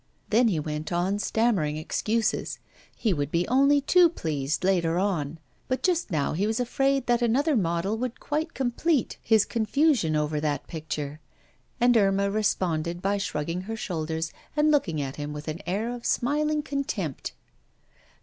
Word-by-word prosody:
Then 230 +3 +5
he 180 -8 +1
went 150 +1 -4
on 180 +4 0
stammering 200 -9 +1
excuses. 215 +8 -1 0.4
He 220 -5 +1
would 145 -3 -2
be 170 +2 0
only 275 +3 +4
too 350 +4 +5
pleased 150 - -2
later 175 -3 +2
on, 165 -6 -1 0.3
but 255 - -2
just 360 -5 +1
now 155 -6 0
he 195 +6 0
was 220 +2 -1
afraid 270 +2 +1
that 240 0 +2
another 270 +6 +2
model 190 +2 0
would 250 -1 -3
quite 310 +2 -2
complete 265 +3 0
his 220 -2 +4
confusion 235 - +2
over 150 0 0
that 145 -2 -1
picture; 155 -2 -5 0.6
and 245 0 +4
Irma 200 -2 +3
responded 175 -5 0
by 195 +2 0
shrugging 165 -1 -2
her 225 - -2
shoulders, 160 -4 -3 0.2
and 300 +1 +4
looking 170 - +1
at 135 -1 -4
him 145 0 -4
with 150 +1 -7
an 155 +2 -3
air 210 +6 -1
of 240 -1 -8
smiling 300 +4 +1
contempt. 270 - -3
200 Hz, 160 wpm, -26 LUFS, 160-245 Hz, 0.6 s, Then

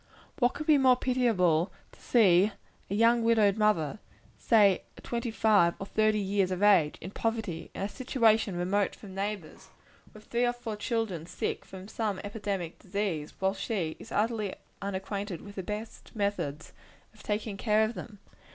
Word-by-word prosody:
What 245 -1 +2
can 305 - -5
be 300 -2 +5
more 260 -2 +6
pitiable, 215 -10 +2 0.2
than - - -20
to - - -22
see 200 -3 +5 0.4
a 200 - -1
young 230 +2 +4
widowed 220 -4 +4
mother 210 -5 +1 0.4
say 205 -5 +4 0.2
at - - -13
twenty 235 0 -3
five 210 -6 +3
or 195 - -6
thirty 215 +1 +2
years 195 -2 +1
of 185 +1 -2
age 190 -8 +5
in 185 - -7
poverty, 220 -7 -3
in - - -3
a - - 0
situation 225 -4 +2
remote 190 +3 0
from 195 -3 -11
neighbors, 195 -3 -5 0.4
with 215 - -14
three 240 +2 -1
or 240 - +1
four 240 -3 -6
children 210 -7 -2
sick - - -4
with 190 +2 -9
some 210 -4 -2
epidemic 200 -5 -4
disease, 190 -6 -3
while 190 0 +1
she 195 -5 -2
is - - -12
utterly 215 -2 0 0.3
unacquainted 195 -1 -4
with 205 - -11
the 195 - -4
best 210 +5 -7
methods 200 -8 -2 0.4
of - - -17
taking 210 0 -2
care 215 +1 +2
of 220 +2 -1
them. 220 -2 -9
205 Hz, 170 wpm, -29 LUFS, 190-225 Hz, 0.4 s, more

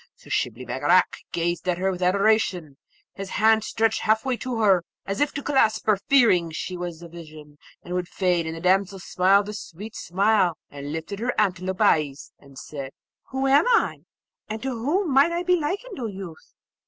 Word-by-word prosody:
So - - -16
Shibli - - -2
Bagarag - - +3 0.3
gazed 175 +1 -2
at 175 - +1
her 190 +1 0
with 180 -1 -6
adoration, 185 -5 +1 0.4
his 195 0 -7
hands 220 +1 +3
stretched 220 0 +1
half 220 +2 +1
way 260 -1 0
to 250 -2 -4
her 190 -5 +4 0.2
as 195 +4 -3
if 290 - +2
to 285 - -4
clasp 220 -6 +2
her, 215 - +4
fearing 200 -6 +3
she 165 +3 -5
was 175 -2 -6
a - - -8
vision 155 -3 -13 0.2
and 175 - -7
would 180 -1 -2
fade; 175 -4 0
and 160 - -4
the 165 - -8
damsel 195 +2 +2
smiled 190 +2 +2
a - - -5
sweet 205 +2 -9
smile, 190 -2 +1
and 145 0 -7
lifted 160 +6 -5
her 245 0 -2
antelope 190 -1 -1
eyes, 150 -8 +1
and 140 -1 -17
said, 135 -1 -7 0.4
'Who 265 0 -2
am 275 - +4
I, 475 -2 +2 0.5
and 220 +1 -4
to 265 - -2
whom 290 - -1
might 280 +5 +5
I 345 +1 -2
be 360 0 +3
likened, 370 - -4
O 235 - -2
youth?' 190 -5 -10
195 Hz, 190 wpm, -24 LUFS, 175-225 Hz, 0.5 s, might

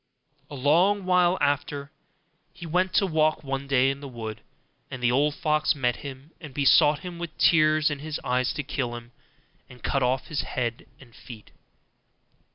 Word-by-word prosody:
A 145 - -8
long 175 +9 +2
while 180 0 +3
after, 145 0 -1 0.6
he - - -10
went 180 +3 0
to 200 - +4
walk 155 -3 +1
one 135 0 -4
day 135 -1 +3
in 135 - -7
the 140 - -8
wood, 115 -4 -7 0.5
and 125 -1 -8
the 120 - +3
old 145 +3 +2
fox 155 -3 +1
met 125 -4 0
him, 140 +2 -10
and 145 -5 -10
besought 145 +1 +4
him 175 -2 -8
with 170 -2 -7
tears 155 -2 +4
in 145 - -4
his 155 +1 -5
eyes 125 0 0
to 150 - -4
kill 130 -4 -3
him, 120 0 -10 0.6
and 125 -1 -15
cut 140 - 0
off 130 +1 0
his 150 -4 -2
head 120 -2 -4
and 120 -4 -17
feet. 110 -3 -13
145 Hz, 175 wpm, -25 LUFS, 130-155 Hz, 0.6 s, to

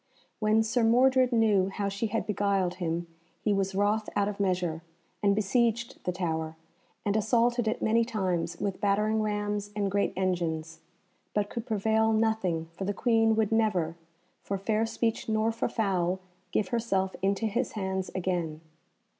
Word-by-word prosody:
When 215 +1 +3
Sir 225 +2 +1
Mordred 255 +2 +4
knew 210 -5 +3
how 200 +1 -2
she 200 +3 -2
had 225 +1 -2
beguiled 195 -3 0
him 170 0 -1 0.4
he 210 - +2
was 195 -1 0
wroth 210 +2 +1
out 200 0 +2
of 205 -1 -4
measure, 180 -4 0 0.4
and 200 -1 +3
besieged 235 +3 0
the 180 - +1
Tower, 160 -3 -2 0.5
and 205 0 +1
assaulted 235 +2 +2
it 220 - -1
many 230 +1 +3
times 185 -7 -1
with 200 -1 -3
battering 210 +2 +2
rams 205 -1 -2
and 200 -2 0
great 200 +1 +1
engines, 170 -4 -1 0.6
but 205 -1 0
could 235 0 -5
prevail 220 0 +2
nothing, 215 -7 +1
for 195 - -6
the 200 +1 -2
Queen 225 0 +3
would 220 -1 +1
never, 200 -8 +1 0.5
for 200 - -3
fair 215 +3 0
speech 225 0 -1
nor 220 +1 +2
for 230 - -2
foul, 190 -4 0 0.3
give 200 -4 0
herself 195 -5 0
into 195 +3 +1
his 235 +4 -1
hands 190 -2 -2
again. 175 -4 -2
205 Hz, 160 wpm, -29 LUFS, 190-225 Hz, 0.6 s, Mordred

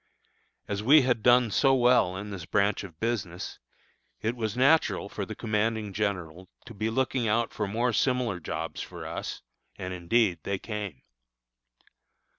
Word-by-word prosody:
As 100 0 -2
we 140 +6 +6
had 125 -3 +1
done 120 -1 +5
so 135 +5 +4
well 120 -7 +3
in 105 +2 -6
this 90 -4 -7
branch 105 0 +1
of 85 -5 -11
business, 100 -6 -3 0.6
it 115 +2 -1
was 110 -2 -3
natural 140 +5 +3
for - - -5
the - - -6
commanding 110 -1 -1
general 95 -4 -3 0.2
to 115 - -10
be 110 +1 -2
looking 125 0 0
out 115 +2 +1
for 105 - -2
more 120 +4 0
similar 125 -6 +1
jobs 80 0 -4
for - - -8
us, - - -5 0.3
and, 90 0 -5
indeed, 90 +2 +1
they 100 - -2
came. 105 - -6
105 Hz, 155 wpm, -28 LUFS, 95-120 Hz, 0.6 s, we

